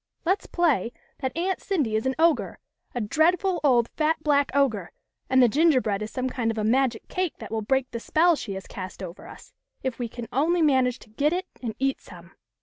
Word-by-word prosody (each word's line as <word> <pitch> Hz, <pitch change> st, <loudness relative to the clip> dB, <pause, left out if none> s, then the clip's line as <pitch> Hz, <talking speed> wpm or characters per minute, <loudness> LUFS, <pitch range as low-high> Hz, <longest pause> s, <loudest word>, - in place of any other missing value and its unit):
" -, -, -46 dB
Let's 375 Hz, +4 st, +1 dB
play 285 Hz, -, +1 dB, 0.3 s
that 260 Hz, +1 st, -3 dB
Aunt 370 Hz, +2 st, -1 dB
Cindy 295 Hz, -, 0 dB
is 220 Hz, +4 st, 0 dB
an 265 Hz, -, 0 dB
ogre, 325 Hz, -1 st, +2 dB, 0.4 s
a 245 Hz, -, -1 dB
dreadful 345 Hz, -, +2 dB
old 245 Hz, -5 st, +4 dB
fat 310 Hz, 0 st, 0 dB
black 285 Hz, -2 st, +3 dB
ogre, 280 Hz, -2 st, +1 dB, 0.4 s
and 260 Hz, -1 st, +5 dB
the -, -, +7 dB
gin 310 Hz, +9 st, +4 dB
gerbread 220 Hz, -8 st, +1 dB
is 215 Hz, -, -4 dB
some 255 Hz, +3 st, -2 dB
kind 245 Hz, -3 st, -1 dB
of 225 Hz, -, -2 dB
a 215 Hz, -, -1 dB
magic 245 Hz, +1 st, +1 dB
cake 365 Hz, -3 st, -2 dB
that -, -, -9 dB
will 225 Hz, -1 st, -1 dB
break 265 Hz, +4 st, 0 dB
the 235 Hz, -, -4 dB
spell 330 Hz, +7 st, +3 dB
she 210 Hz, -8 st, -5 dB
has 190 Hz, 0 st, -7 dB
cast 185 Hz, 0 st, -8 dB
over 175 Hz, 0 st, -9 dB
us, -, -, -13 dB, 0.3 s
if 260 Hz, -2 st, -3 dB
we 240 Hz, -2 st, -3 dB
can 235 Hz, 0 st, -7 dB
only 325 Hz, +5 st, +2 dB
manage 260 Hz, -4 st, +3 dB
to -, -, -16 dB
get 290 Hz, +8 st, +1 dB
it 365 Hz, +1 st, -2 dB, 0.2 s
and 230 Hz, -4 st, -4 dB
eat 270 Hz, 0 st, 0 dB
some." -, -, -14 dB
265 Hz, 225 wpm, -25 LUFS, 230-315 Hz, 0.4 s, the